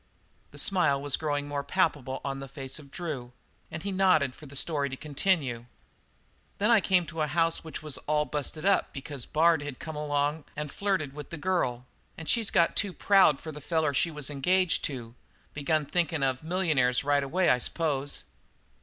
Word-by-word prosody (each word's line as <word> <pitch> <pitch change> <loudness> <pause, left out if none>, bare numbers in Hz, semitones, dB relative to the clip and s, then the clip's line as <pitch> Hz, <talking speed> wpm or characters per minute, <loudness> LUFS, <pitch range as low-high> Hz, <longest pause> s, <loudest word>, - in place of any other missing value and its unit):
The - - -14
smile 180 -8 +2
was 140 -1 0
growing 145 -2 -2
more 145 -1 -3
palpable 135 -1 0
on 135 -1 -3
the 135 - -7
face 135 +1 -6
of 140 -2 -14
Drew, 135 -7 -5 0.4
and 155 +1 -6
he 200 - -2
nodded 185 -8 +3
for 150 - -13
the 140 - -11
story 140 -1 0
to 130 - -6
continue. 140 -6 0 0.9
"Then 210 +4 +2
I 225 -3 +6
come 185 -3 +3
to 165 -1 -5
a 155 - +2
house 165 +1 +1
which 160 -1 -7
was 150 -3 -3
all 150 0 +2
busted 150 +3 -3
up 200 - +2
because 135 -2 -5
Bard 160 0 +3
had 145 -3 -6
come 160 -1 -7
along 150 0 -1
and 150 -1 -4
flirted 190 -9 -1
with 150 -1 -8
the 170 - -6
girl, 145 -9 -1 0.3
and 160 - -8
she's 230 -4 +3
got 170 - +3
too 200 -3 0
proud 190 -9 +4
for 160 - -7
the 150 0 -9
feller 160 -1 0
she 170 - +2
was 150 -3 -5
engaged 180 +6 +2
to 120 -6 -5 0.4
begun 150 +1 0
thinkin' 160 -2 0
of 130 -1 0
millionaires 155 -8 +1
right 145 0 +3
away, 175 +7 +1
I 125 - +4
s'pose. 145 -1 0
150 Hz, 190 wpm, -28 LUFS, 140-170 Hz, 0.9 s, I